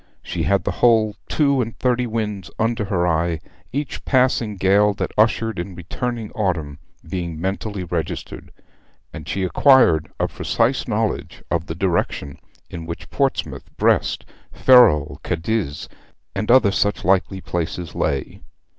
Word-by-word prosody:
She - - -4
had 100 +1 +2
the - - -1
whole 110 -3 +4
two 140 -3 +2
and 115 -1 -5
thirty 125 -1 +1
winds 105 -6 -3
under 115 -1 0
her 90 -4 0
eye, 80 0 0 0.3
each 140 +3 -4
passing 125 -5 +1
gale 100 +2 +3
that - - -3
ushered 110 -1 +2
in 90 +1 -5
returning 115 +5 -4
autumn 85 - -2 0.3
being 85 -2 -4
mentally 95 +2 -3
registered; 85 -3 -5 0.6
and 75 - -8
she 95 - -1
acquired 95 - +4
a - - +1
precise - - 0
knowledge - - -2
of 85 +1 -1
the 80 - -4
direction 85 -5 -1 0.3
in 80 -1 -8
which 85 - -7
Portsmouth, - - -1
Brest, - - +1 0.3
Ferrol, 120 - +5
Cadiz, 90 -3 -2 0.5
and 105 +2 -3
other 120 -5 +6
such 100 -1 0
likely 95 +1 +2
places 85 -1 -4
lay. 70 -1 -2
100 Hz, 135 wpm, -21 LUFS, 85-115 Hz, 0.6 s, other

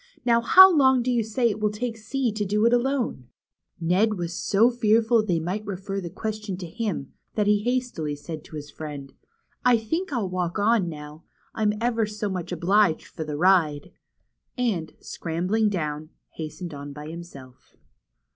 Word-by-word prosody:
Now 235 -1 +4
how 370 +10 +8
long 265 -4 +4
do 255 - 0
you 240 -2 +2
say 230 +2 +1
it 205 - -5
will 210 0 +1
take 225 +3 -4
C 235 +3 -2
to 210 0 -2
do 210 +2 +1
it 235 - +4
alone? 245 - 0 0.3
" - - -67 0.2
Ned 185 +6 +2
was 175 -1 -3
so 215 +6 +3
fearful 230 0 +3
they 180 -6 0
might 185 +6 -3
refer 195 0 -4
the 175 - -5
question 215 -1 -4
to 180 - -6
him, 185 - -4 0.2
that 210 - +1
he 210 0 +3
said 210 - -8
hastily 245 -13 -2
to 155 +1 -8
his 145 -1 -7
friend: 145 -3 -8 0.5
I 250 -1 +5
think 320 - -3
1 250 -6 -1
11 190 -3 -3
walk 180 -1 -2
on 210 -3 +2
now. 150 0 -10 0.3
I'm 210 -1 +1
ever 230 -2 +1
so 210 0 -3
much 185 -3 -4
obliged 180 0 +2
for 160 - -7
the 150 -1 -5
ride," 160 -5 +2 0.7
and 210 -10 -1
scrambling 180 +7 -1
down, 155 -5 -3 0.2
hastened 165 +2 -7
on 145 0 -7
by 150 +1 -8
himself. 155 -6 -11
205 Hz, 180 wpm, -25 LUFS, 165-225 Hz, 0.7 s, how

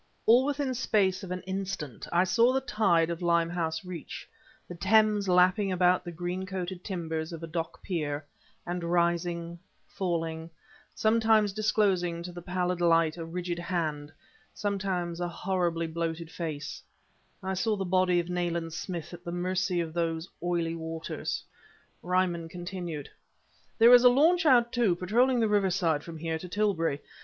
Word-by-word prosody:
All 245 +4 +6
within 285 -2 -1
space 200 -6 +1
of 190 - -8
an 180 0 -3
instant 190 - -5
I 175 +1 +4
saw 230 +6 +4
the 265 - +2
tide 190 -10 +2
of 170 +1 -5
Limehouse 170 -1 0
Reach, 180 -3 -7 0.4
the - - -7
Thames 205 +2 +3
lapping 185 +3 +4
about 180 0 +3
the 175 - -6
green 175 +2 -4
coated 185 -1 -5
timbers 160 -4 -3
of 165 -1 -7
a - - -4
dock 165 0 -5
pier; 150 -5 -3 0.4
and 175 0 -3
rising 170 0 0 0.3
falling 165 -3 -3 0.5
sometimes 220 -2 +3
disclosing 195 -5 +1
to 180 - -6
the 175 0 -8
pallid 180 0 -2
light 165 -2 +3
a 170 - -6
rigid 175 +1 -4
hand, 155 -4 -2 0.4
sometimes 190 -4 -2
a 175 - 0
horribly 175 -2 -1
bloated 165 0 -4
face 155 -3 -5 0.6
I 190 0 -2
saw 215 +3 0
the 195 -1 -3
body 185 -1 +3
of 170 - -2
Nayland 170 -2 -2
Smith 170 -1 -5
at 175 0 -10
the 170 - -5
mercy 180 0 0
of 160 -1 -5
those 165 0 -1
oily 170 -1 -1
waters. 165 0 -4 0.6
Ryman 175 -2 0
continued: 175 -4 -6 0.7
"There 235 +1 +8
is 245 0 +8
a 250 - +9
launch 325 +6 +4
out, 240 -3 +5
too, 225 -7 +2
patrolling 235 +8 +2
the 225 - +3
riverside 190 -7 +1
from 165 -1 -8
here 160 0 -3
to 180 - -8
Tilbury. 175 -8 0
175 Hz, 155 wpm, -29 LUFS, 165-195 Hz, 0.7 s, a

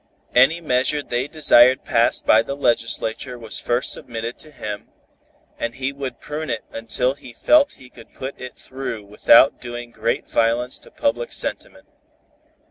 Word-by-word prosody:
Any 135 +7 +4
measure 145 0 0
they 120 +1 -2
desired 130 -5 +5
passed 115 0 +2
by 110 - +6
the 140 +4 -5
legislature 120 -1 0
was 115 -2 -4
first 120 +1 0
submitted 115 0 -3
to 155 - -10
him, 105 -8 -7 0.7
and 115 0 -3
he 135 +1 -3
would 135 -4 -6
prune 150 0 -6
it 115 -2 -3
until 120 +3 -1
he 125 -3 -13
felt 295 - +3
he 130 - -16
could 115 - -16
put 130 +1 -8
it 125 -1 -8
through 130 -5 -7
without 105 +3 +5
doing 120 -1 -7
too - - -23
great 115 +2 -1
violence 120 +2 +1
to - - -16
public 300 +12 -2
sentiment. - - -4
125 Hz, 160 wpm, -21 LUFS, 115-140 Hz, 0.7 s, by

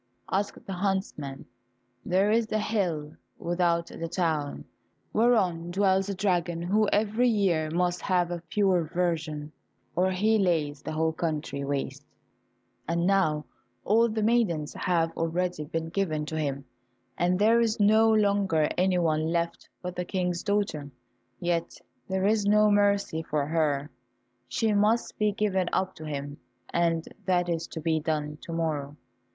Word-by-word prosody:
asked 200 +1 -2
the 195 - -5
huntsman. 180 -8 -2 0.6
"There 190 +3 +2
is 225 0 +1
a 215 - +2
high 210 - -2
hill 165 -8 -1 0.2
without 170 -1 +1
the 165 - -6
town, 160 -4 -1 0.5
whereon 190 -8 +2
dwells 190 +1 +2
a 200 - -2
dragon 175 -3 0
who 210 +4 +2
every 220 +4 +2
year 180 -8 +1
must 175 +2 0
have 175 -2 +1
a 175 -1 -4
pure 190 -4 +2
virgin, 160 -3 -2 0.4
or 185 +2 +3
he 215 +4 +2
lays 155 -6 0
the 155 - -5
whole 160 +1 +1
country 155 -4 -3
waste, 140 0 -3 0.8
and 170 +1 0
now 180 -6 +2 0.4
all 230 +3 +4
the 215 0 -1
maidens 210 -10 +1
have 165 -3 0
already 165 -1 -1
been 165 +2 -3
given 160 -5 -1
to 160 - -5
him, 140 -3 -2 0.5
and 175 +2 +1
there 225 +4 +4
is 225 -2 0
no 220 +2 +5
longer 200 -7 +2
anyone 170 -4 +2
left 170 0 -2
but 180 0 -4
the 180 - -2
King's 180 -1 -2
daughter, 200 -9 -1 0.5
yet 170 -1 -1 0.3
there 190 0 0
is 210 0 +2
no 210 0 +5
mercy 200 -5 +2
for 150 -2 -1
her; 150 -2 0 0.6
she 215 - 0
must 210 +3 +1
be 210 -1 +3
given 195 -3 0
up 190 0 0
to 155 - -10
him, 145 -1 -5 0.4
and 165 -1 +1 0.2
that 180 -1 +2
is 165 -1 -2
to 160 - -7
be 160 0 +1
done 150 -1 -2
to - - -8
morrow." 150 -4 -2
175 Hz, 150 wpm, -27 LUFS, 160-200 Hz, 0.8 s, no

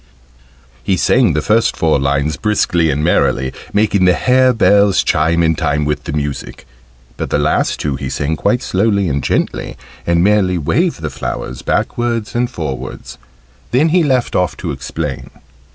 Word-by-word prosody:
He 95 - 0
sang 120 -5 +3
the 75 +1 -1
first 110 +1 +2
four 80 -3 +2
lines 70 +2 0
briskly 90 -6 +1
and 75 0 -1
merrily, 65 -5 +1 0.2
making 105 -2 +2
the 90 - +4
hare 130 0 +3
bells 100 -4 +3
chime 85 +1 +1
in 80 0 +3
time 75 -2 -1
with 75 0 -2
the - - -4
music; 75 -1 -4 0.5
but - - -4
the - - +1
last 75 +1 0
two 70 -2 -2
he 70 -2 -5
sang 75 +4 -2
quite 125 +10 0
slowly 100 0 +1
and 70 -2 -1
gently, - - -2 0.3
and 85 0 +3
merely 100 -3 +2
waved 160 - 0
the 75 - -3
flowers 65 -1 -5
backwards 120 -2 -1
and 120 0 0
forwards. 80 - -6 0.5
Then 150 +6 +2
he 175 +2 +3
left 130 -6 0
off 90 -1 0
to 85 -3 -4
explain. 70 +1 -5
85 Hz, 165 wpm, -16 LUFS, 75-110 Hz, 0.5 s, the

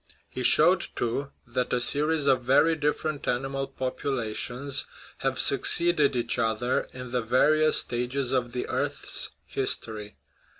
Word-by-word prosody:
He - - -7
showed, - - +3
too, 130 +4 -3 0.2
that 125 0 -3
a 125 - 0
series 150 +4 +3
of 135 -2 +2
very 140 +6 +2
dif 150 -1 -1
ferent 155 -2 -5
animal 135 +2 -3
populations 130 0 -3 0.3
have 135 -1 -2
succeeded 150 -1 +4
each 120 - -1
other 115 +3 -1
in 125 -1 -10
the 125 0 -1
various 150 +7 +2
stages 125 +2 -1
of 125 -2 -1
the 125 - -5
earth's - - -1 0.2
history. 110 -5 0
130 Hz, 135 wpm, -25 LUFS, 120-140 Hz, 0.3 s, succeeded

